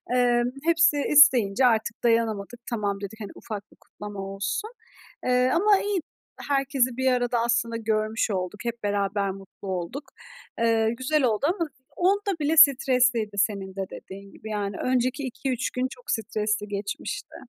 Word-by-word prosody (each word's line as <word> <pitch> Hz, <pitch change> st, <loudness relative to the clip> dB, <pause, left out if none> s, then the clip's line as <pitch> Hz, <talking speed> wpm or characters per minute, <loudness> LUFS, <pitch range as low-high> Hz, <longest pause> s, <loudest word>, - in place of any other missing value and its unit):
Emm, 245 Hz, -1 st, +3 dB
hepsi 325 Hz, -2 st, +4 dB
isteyince 255 Hz, -6 st, +6 dB
artık 230 Hz, -1 st, +1 dB
dayanamadık, 230 Hz, -1 st, 0 dB
"Tamam," 205 Hz, -4 st, -2 dB
dedik, 215 Hz, +2 st, -8 dB
hani, 205 Hz, -, -6 dB
"ufak 210 Hz, -2 st, -8 dB
bir -, -, -22 dB
kutlama 205 Hz, -1 st, -10 dB
olsun." 195 Hz, -, -3 dB, 0.5 s
Eee, 250 Hz, 0 st, +3 dB
ama 400 Hz, +3 st, +4 dB
iyi 405 Hz, -2 st, -1 dB, 0.5 s
herkesi 270 Hz, -3 st, +1 dB
bir 260 Hz, 0 st, +2 dB
arada 245 Hz, -1 st, +1 dB
aslında 235 Hz, 0 st, 0 dB
görmüş 220 Hz, 0 st, -1 dB
olduk, 185 Hz, +2 st, -3 dB
hep 235 Hz, -2 st, -4 dB
beraber 200 Hz, -1 st, 0 dB
mutlu 195 Hz, +1 st, -11 dB
olduk. 190 Hz, -, -4 dB, 0.6 s
Eee, 225 Hz, -1 st, +2 dB
güzel 285 Hz, +2 st, +1 dB
oldu 230 Hz, +2 st, +1 dB
ama 335 Hz, -4 st, -2 dB, 0.3 s
onda 395 Hz, 0 st, +1 dB
bile 310 Hz, +2 st, 0 dB
stresliydi 250 Hz, -7 st, +4 dB
senin 195 Hz, -2 st, -1 dB
de 195 Hz, -, -2 dB
dediğin 195 Hz, +1 st, -10 dB
gibi, 220 Hz, -, -11 dB
yani. 205 Hz, -2 st, -3 dB
Önceki 255 Hz, +2 st, 0 dB
2-3 260 Hz, 0 st, -2 dB
gün 255 Hz, +1 st, -1 dB
çok -, -, -7 dB
stresli 215 Hz, -1 st, -1 dB
geçmişti. 205 Hz, -, -5 dB
230 Hz, 150 wpm, -25 LUFS, 205-260 Hz, 0.6 s, isteyince